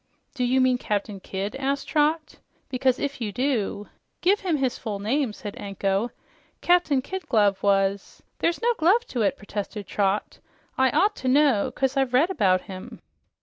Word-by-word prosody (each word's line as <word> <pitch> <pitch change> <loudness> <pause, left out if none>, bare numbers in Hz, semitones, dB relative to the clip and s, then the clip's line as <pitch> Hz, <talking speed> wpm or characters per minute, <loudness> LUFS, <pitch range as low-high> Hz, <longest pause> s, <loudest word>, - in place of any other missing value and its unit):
"Do 255 - -2
you 255 +2 +2
mean 255 -1 +3
Captain 205 -2 -2
Kidd?" 195 +5 -4
asked 275 +1 -2
Trot. 305 +1 0 0.3
"Because 255 -1 +1
if 280 -2 -4
you 215 -3 -2
do 220 -4 -1
" - - -50
"Give 395 +4 +4
him 350 -5 0
his 260 -3 -1
full 215 -4 -4
name," 235 +5 0
said 205 -1 -8
Anko. 195 +2 -1 0.5
"Captain 335 -7 +3
Kid 380 +5 -6
Glove 205 -5 +3
was 195 0 +1
" - - -47
"There's 340 +6 0
no 480 0 +3
glove 390 +9 +4
to 245 - -2
it," 220 +6 +1
protested 205 0 -6
Trot. 200 +1 -1 0.4
"I 265 0 +3
ought 415 - +2
to 260 - -4
know, 270 -5 +3
'cause 270 0 -1
I've 265 -2 +1
read 320 +9 +4
about 190 - +2
him." 185 -2 -10
255 Hz, 180 wpm, -25 LUFS, 205-285 Hz, 0.5 s, Give